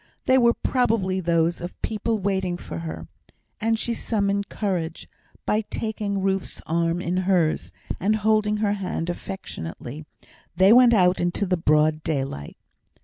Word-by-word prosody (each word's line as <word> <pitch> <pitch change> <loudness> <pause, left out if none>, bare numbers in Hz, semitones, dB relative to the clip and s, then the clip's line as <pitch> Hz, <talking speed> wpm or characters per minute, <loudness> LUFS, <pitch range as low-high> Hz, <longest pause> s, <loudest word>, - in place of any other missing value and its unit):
They 260 0 +5
were 235 -1 +4
probably 215 -7 +1
those 170 -1 +1
of 175 +1 -7
people 220 +1 -1
waiting 190 -3 -1
for 85 - -7
her; 80 0 -6 0.5
and 225 +1 +1
she 235 +1 -1
summoned 200 -3 -1
courage, 180 -6 -3 0.4
and 210 0 0
taking 210 -3 -2
Ruth's 195 -1 -1
arm 170 +2 0
in 180 +2 -1
hers, 175 - +1 0.3
and 210 +4 +2
holding 215 0 +2
her 210 -1 +1
hand 180 -4 -2
affectionately, 150 - -7 0.5
they 190 +4 +6
went 245 -1 +7
out 180 -2 +3
into 175 +4 0
the 185 -1 +1
broad 155 -1 +2
daylight. 135 - -3
190 Hz, 145 wpm, -24 LUFS, 165-210 Hz, 0.5 s, went